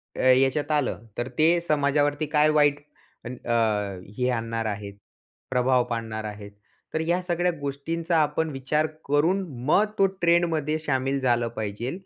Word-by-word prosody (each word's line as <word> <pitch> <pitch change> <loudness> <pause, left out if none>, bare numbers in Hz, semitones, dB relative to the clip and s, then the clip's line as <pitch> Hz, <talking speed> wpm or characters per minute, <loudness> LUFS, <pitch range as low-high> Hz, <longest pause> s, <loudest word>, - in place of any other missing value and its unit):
अ, - - -3
ह्याच्यात 135 +4 +1
आलं. 145 -6 -1
तर 120 - -2
ते 165 +3 +4
समाजावरती 145 0 +1
काय 150 +1 +5
वाईट 145 -1 +3 0.7
अ, - - -2 0.7
हे 125 0 +1
आणणार 115 -2 -2
आहेत 100 -1 -5 0.6
प्रभाव 125 0 +3
पाडणार 110 -2 -4
आहेत. 105 -1 -8 0.4
तर 160 - 0
ह्या 175 +2 +1
सगळ्या 175 0 0
गोष्टींचा 165 +5 -2
आपण 155 +1 +1
विचार 145 +3 0 0.2
करून 160 +7 +2 0.3
मग 205 +7 +4
तो 195 - +6 0.2
ट्रेंडमध्ये 165 -3 +2
शामिल 135 -2 -1
झालं 120 -2 +2
पाहिजे. 110 +4 -3
145 Hz, 140 wpm, -25 LUFS, 120-160 Hz, 0.7 s, तो